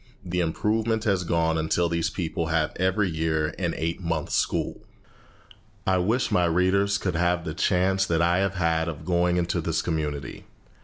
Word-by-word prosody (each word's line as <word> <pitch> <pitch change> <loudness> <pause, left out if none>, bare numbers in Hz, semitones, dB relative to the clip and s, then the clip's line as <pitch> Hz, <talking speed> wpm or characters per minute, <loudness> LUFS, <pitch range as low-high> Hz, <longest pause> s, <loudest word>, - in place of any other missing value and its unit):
The 90 0 -2
improvement 110 +6 0
has 95 -4 +1
gone 80 -1 +1
on 80 - -1
until 85 +2 +1
these 85 0 0
people 85 -2 -3
have 80 -1 0
every 95 +3 +1
year 80 -1 -1
an 85 -3 -1
eight 85 +3 -2
months' 85 -3 -2
school. - - -1 1.0
I 95 -1 +2
wish 110 +8 +1
my 90 - +3
readers 95 +4 +2
could 90 -3 -2
have 85 0 +1
the 80 - -3
chance 95 +3 +1
that 80 -1 +1
I 85 +2 +3
have 95 0 0
had 80 -2 +1
of 80 -1 -7
going 90 0 +2
into 85 0 0
this 80 0 -1
community. 75 -5 -3
85 Hz, 175 wpm, -25 LUFS, 80-95 Hz, 1.0 s, my